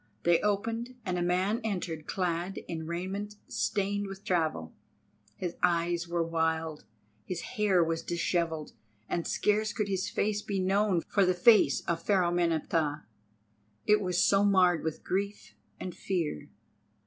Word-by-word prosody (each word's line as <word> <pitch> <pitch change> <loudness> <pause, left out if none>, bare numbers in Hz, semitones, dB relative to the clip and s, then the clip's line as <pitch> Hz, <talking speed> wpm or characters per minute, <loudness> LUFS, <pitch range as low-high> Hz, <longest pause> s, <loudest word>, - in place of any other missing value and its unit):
They 170 -1 +4
opened, 230 +4 -1
and 180 -1 -1
a - - -1
man 185 +6 +1
entered 175 -7 -3
clad 180 +1 -2
in 160 -1 -5
raiment 190 +5 -4
stained 200 0 -1
with 195 +1 -9
travel. 160 - -1 0.6
His 175 +7 -4
eyes 170 -1 +1
were 170 0 0
wild, 160 -1 -1 0.4
his 175 - -4
hair 205 -7 +2
was 165 0 -1
dishevelled, 170 -2 -1 0.4
and 170 - -2
scarce 210 0 +1
could 210 -1 -2
his 190 -1 -1
face 210 0 0
be 200 -2 -2
known 190 -1 +2
for 200 - +3
the 185 -1 +3
face 215 +5 +5
of 170 -1 -2
Pharaoh 185 -2 +2
Meneptah, 160 -3 0 0.8
it 210 0 +4
was 180 -2 0
so 200 0 +4
marred 185 -5 +4
with 160 -1 -3
grief 200 +2 -3 0.3
and 180 - -5
fear. 165 - -3
180 Hz, 145 wpm, -30 LUFS, 165-200 Hz, 0.8 s, face